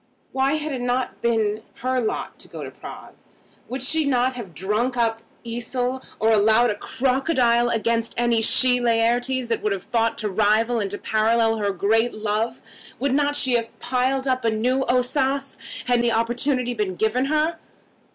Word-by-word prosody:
Why 270 +1 +1
had 310 -1 -2
it 255 - -4
not 245 +1 -2
been 220 -2 0 0.2
her 255 0 +1
lot 220 - -4
to - - -7
go - - -8
to - - -7
Prague? - - -11 0.6
Would 255 +1 -4
not - - -5
she 310 0 +2
have 245 - -1
drunk 215 - -1
up 225 -1 0 0.2
Esil, 245 +2 -3 0.2
or 225 +1 +3
swallowed 220 +3 +4
a - - -3
crocodile 250 0 +1
against 230 0 -1
any 235 -1 +2
she 250 +2 +4
Laertes 240 +2 +1
that 230 - -1
would 210 - -1
have 195 -1 -5
thought 230 -1 0
to 215 - -2
rival 220 +4 +2
and 200 -2 -2
to 205 - -4
parallel 225 +1 +1
her 205 -2 -1
great 220 +5 +1
love? 215 +1 -2 0.3
Would 275 0 0
not 290 +1 +1
she 265 -3 +3
have 230 -1 -1
piled 260 +2 0
up 255 -1 0
new 235 +4 +1
Ossas, 260 +2 0 0.3
had 245 -1 +2
the 240 0 +2
opportunity 245 +2 0
been 210 -5 -2
given 220 +6 +1
her? 310 +3 0
240 Hz, 170 wpm, -23 LUFS, 225-255 Hz, 0.6 s, swallowed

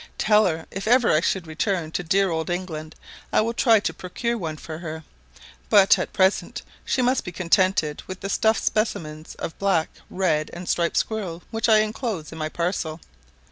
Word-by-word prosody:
Tell 210 -1 +4
her 160 -2 -3
if 195 +2 -5
ever 245 +1 +5
I 155 - +4
should 185 0 0
return 160 +1 -2
to 180 - -2
dear 190 +2 +2
old 160 +1 -2
England, 160 -3 -4 0.4
I - - +4
will 230 +2 -1
try 230 -2 +4
to 165 - -2
procure 185 +8 -3
one 160 -8 -4
for 155 +1 -8
her; 160 -2 -6 0.7
but 200 -2 +6
at - - -3
present 190 0 +1 0.2
she 255 - 0
must 255 +1 +2
be 180 - -6
contented 175 -3 +1
with 185 0 -7
the 195 - -3
stuffed 220 +2 +2
specimens 155 -8 -2
of - - -5
the - - -31
black, 195 -5 +2 0.2
red, 160 -5 0
and 175 +1 -7
striped 170 -1 0
squirrels 185 -6 -2
which 225 0 0
I 215 -1 +6
enclose 215 - -3
in 160 - -8
my 155 0 -2
parcel. 170 -1 -2
180 Hz, 190 wpm, -24 LUFS, 160-215 Hz, 0.7 s, but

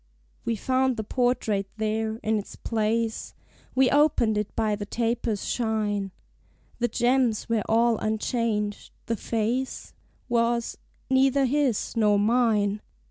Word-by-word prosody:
We 230 - 0
found 260 +3 +1
the 220 - -2
portrait 230 -4 0
there, 220 0 -1
in 220 0 +1
its 205 - -9
place: 225 0 -1 0.4
We 260 -1 +4
opened 285 -7 +3
it 210 0 -3
by 215 -2 +1
the 205 0 -6
tapers' 230 -2 -1
shine: 210 -4 -1 0.7
The 240 - +2
gems 240 -2 +1
were 230 -2 +1
all 230 0 +3
unchanged: 215 -1 -1
the 230 - -1
face 230 +4 -2 0.3
Was 235 -1 +1 0.3
neither 270 +1 +3
his 265 -4 0
nor 210 -2 +3
mine. 210 -2 +2
225 Hz, 125 wpm, -26 LUFS, 215-245 Hz, 0.7 s, We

